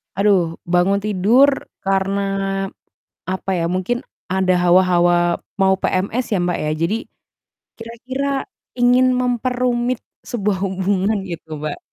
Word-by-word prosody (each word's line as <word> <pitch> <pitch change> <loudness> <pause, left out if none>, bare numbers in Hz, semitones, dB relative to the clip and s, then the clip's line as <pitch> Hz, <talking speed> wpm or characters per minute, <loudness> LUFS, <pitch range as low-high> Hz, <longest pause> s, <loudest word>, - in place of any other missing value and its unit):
Aduh, 190 -4 +2 0.2
bangun 180 +3 +3
tidur 215 +7 +4 0.3
karena 195 0 0 1.1
apa 190 +1 -3
ya, 165 - 0
mungkin 185 +7 -2 0.3
ada 190 -1 +2
hawa-hawa 175 -1 +3 0.2
mau 190 0 +4
PMS 205 +7 0
ya, 205 - +2
Mbak, 175 0 0
ya, 150 - -1
jadi 170 +6 +1 0.8
kira-kira 250 +4 -4 0.5
ingin 245 +1 +4
memperumit 250 0 0 0.3
sebuah 205 -4 -1
hubungan 190 +2 0
gitu, 165 -4 -7
Mbak. 150 -1 -4
195 Hz, 110 wpm, -20 LUFS, 180-240 Hz, 1.1 s, tidur